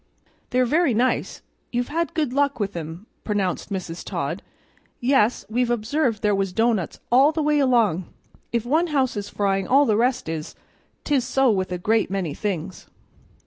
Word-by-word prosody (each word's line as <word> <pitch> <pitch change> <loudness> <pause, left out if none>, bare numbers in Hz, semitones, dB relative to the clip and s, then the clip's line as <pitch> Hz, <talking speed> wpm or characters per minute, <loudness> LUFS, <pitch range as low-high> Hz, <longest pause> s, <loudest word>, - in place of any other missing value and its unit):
"They're 255 0 +2
very 295 -1 +2
nice; 250 +3 0 0.3
you've 245 0 -1
had 335 +2 -2
good 300 -6 0
luck 280 -1 +1
with 200 -2 -2
'em," 165 +4 -6 0.2
pronounced 200 -4 -1
Mrs. 180 -3 -4
Todd. - - -3 0.6
"Yes, 245 -3 +2
we've 240 +2 0
observed 240 0 0
there 210 -1 +3
was 195 -1 0
doughnuts 225 -4 0
all 270 +5 +6
the 315 -1 -1
way 300 0 +2
along; 230 - +2 0.5
if 235 -1 -1
one 315 +7 +2
house 270 -6 0
is 205 -1 -4
frying 195 -2 0
all 280 +3 +5
the 215 - +2
rest 250 +1 +1
is; 160 -1 -5 0.5
'tis 280 -4 +1
so 260 0 +2
with 190 -3 -1
a 180 - -1
great 220 +5 +1
many 185 -6 -2
things." 185 -1 -4
230 Hz, 170 wpm, -23 LUFS, 195-265 Hz, 0.6 s, all